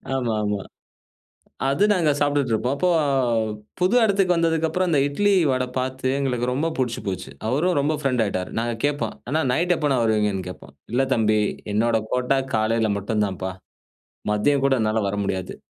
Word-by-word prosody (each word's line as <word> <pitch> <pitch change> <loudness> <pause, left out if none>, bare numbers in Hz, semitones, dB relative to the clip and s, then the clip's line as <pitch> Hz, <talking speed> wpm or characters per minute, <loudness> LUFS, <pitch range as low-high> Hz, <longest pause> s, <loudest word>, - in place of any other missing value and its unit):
ஆமா, 120 -4 -1
ஆமா. 105 -1 -1 1.1
அது 140 +9 +2
நாங்க 170 -7 +3
சாப்டுட்டு 145 -4 +1
இருப்போம். 125 +5 0
அப்போ 180 +4 +1 0.9
புது 185 +7 +2
எடத்துக்கு 195 -4 +3
வந்ததுக்கப்பறம், 165 +2 +1
அந்த 150 - +3
இட்லி, 205 +8 +1 0.2
வடை 130 0 0
பாத்து 130 0 -2
எங்களுக்கு 125 -3 -1
ரொம்ப 150 +5 0
புடிச்சி 125 -4 -1
போச்சு. 95 -8 -4 0.2
அவரும் 160 +9 +1
ரொம்ப 150 +3 +1
ஃப்ரண்ட் 130 -4 +1
ஆயிட்டாரு. 95 -3 -2
நாங்க 120 0 -1
கேப்போம், 145 -7 0 0.2
"அண்ணா 155 +3 +1
நைட் 175 +5 +2
எப்பண்ணா 145 -4 +1
வருவீங்கன்னு?" 105 -4 +1
கேப்போம். 90 - -11 0.2
"இல்ல 135 +2 +3
தம்பி, 110 -3 +2 0.3
என்னோட 115 +2 +2
கோட்டா 125 +2 +1 0.2
காலையில 110 0 +1
மட்டுந்தாப்பா. 100 -3 -2 0.8
மதியம் 135 +7 +2
கூட 135 -1 +4
என்னால 110 0 +1
வரமுடியாது. 100 -2 -3
130 Hz, 150 wpm, -23 LUFS, 110-150 Hz, 1.1 s, கூட